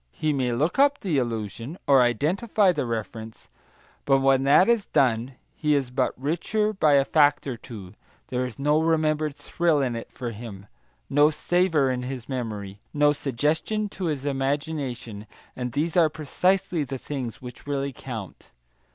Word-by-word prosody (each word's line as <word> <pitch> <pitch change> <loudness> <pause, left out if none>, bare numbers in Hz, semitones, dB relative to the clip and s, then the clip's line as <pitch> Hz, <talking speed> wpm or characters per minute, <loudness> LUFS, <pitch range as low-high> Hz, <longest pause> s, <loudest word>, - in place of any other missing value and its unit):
He 155 -1 0
may 130 -3 0
look 150 - 0
up 285 +1 +4
the 170 -9 +1
allusion, 115 - -4
or 135 -2 +6
identify 185 - +2
the 145 -7 -2
reference, 110 0 -6 0.6
but 135 -1 +4
when 135 0 +3
that 145 +7 +6
is 235 -4 +2
done 125 -2 +1 0.2
he 150 -2 +1
is 135 -3 -1
but 125 - -1
richer 190 +9 0
by 155 -7 +3
a 140 -1 +5
fact 145 -1 +3
or 135 -3 -3
two; 105 -6 -10 0.4
there 125 0 -1
is 125 -3 -6
no 150 +3 +2
remembered 155 -2 +1
thrill 155 +2 0
in 130 -4 0
it 115 - -7
for 120 -2 -5
him, 105 -3 -9 0.4
no 145 +2 +4
savour 160 -3 +1
in 125 -1 -2
his 125 -1 -6
memory, 105 -6 -5 0.2
no 145 0 +4
suggestion 150 - -1
to 190 -1 -5
his 145 -4 -2
imagination; 135 -6 -3 0.3
and 125 -1 -4
these 155 +4 -1
are 165 -3 +5
precisely 175 +3 0
the 135 -1 -5
things 130 -4 -5
which 125 +2 -11
really 140 -1 -2
count. 115 -7 -8
140 Hz, 165 wpm, -25 LUFS, 125-155 Hz, 0.6 s, or